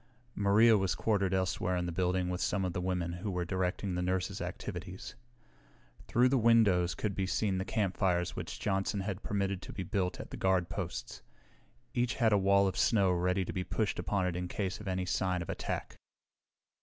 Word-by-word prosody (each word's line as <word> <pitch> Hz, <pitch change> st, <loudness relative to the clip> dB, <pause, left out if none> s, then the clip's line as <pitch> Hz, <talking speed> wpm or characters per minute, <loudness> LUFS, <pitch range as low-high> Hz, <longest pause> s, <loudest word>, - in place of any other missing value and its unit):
Maria 105 Hz, +2 st, +5 dB
was 95 Hz, -1 st, 0 dB
quartered 100 Hz, -4 st, +1 dB
elsewhere 95 Hz, -1 st, 0 dB
in 90 Hz, -, -1 dB
the 85 Hz, -, -3 dB
building 90 Hz, +1 st, 0 dB
with 90 Hz, 0 st, -2 dB
some 95 Hz, -2 st, 0 dB
of 90 Hz, -, -2 dB
the 90 Hz, -, -2 dB
women 90 Hz, -2 st, -1 dB
who 90 Hz, +4 st, -4 dB
were 90 Hz, -2 st, -2 dB
directing 95 Hz, +1 st, -1 dB
the 90 Hz, -, -1 dB
nurses' 95 Hz, +2 st, -1 dB
activities. 90 Hz, 0 st, -6 dB, 0.9 s
Through 125 Hz, +2 st, +4 dB
the 135 Hz, 0 st, +3 dB
windows 105 Hz, -7 st, +4 dB
could 105 Hz, -2 st, -2 dB
be 95 Hz, 0 st, -1 dB
seen 95 Hz, -1 st, 0 dB
the 95 Hz, -, -2 dB
campfires 95 Hz, -4 st, 0 dB
which -, -, -6 dB
Johnson 95 Hz, 0 st, 0 dB
had 100 Hz, 0 st, -4 dB
permitted 100 Hz, -2 st, -1 dB
to -, -, -9 dB
be 95 Hz, -, -4 dB
built 90 Hz, -1 st, -1 dB
at -, -, -8 dB
the -, -, -6 dB
guard 95 Hz, -2 st, +1 dB
posts. 100 Hz, -4 st, -5 dB, 0.7 s
Each 120 Hz, 0 st, 0 dB
had 115 Hz, -4 st, +3 dB
a -, -, +5 dB
wall 100 Hz, 0 st, +4 dB
of 95 Hz, -, -2 dB
snow 95 Hz, +1 st, +3 dB
ready 90 Hz, +2 st, +1 dB
to -, -, -5 dB
be 90 Hz, -, -2 dB
pushed 110 Hz, +2 st, -1 dB
upon 100 Hz, -3 st, 0 dB
it 90 Hz, -2 st, -1 dB
in 90 Hz, 0 st, -3 dB
case 95 Hz, 0 st, -3 dB
of 105 Hz, -, -9 dB
any 95 Hz, -1 st, -1 dB
sign 90 Hz, -1 st, 0 dB
of -, -, -4 dB
attack. -, -, -4 dB
95 Hz, 200 wpm, -32 LUFS, 90-100 Hz, 0.9 s, Maria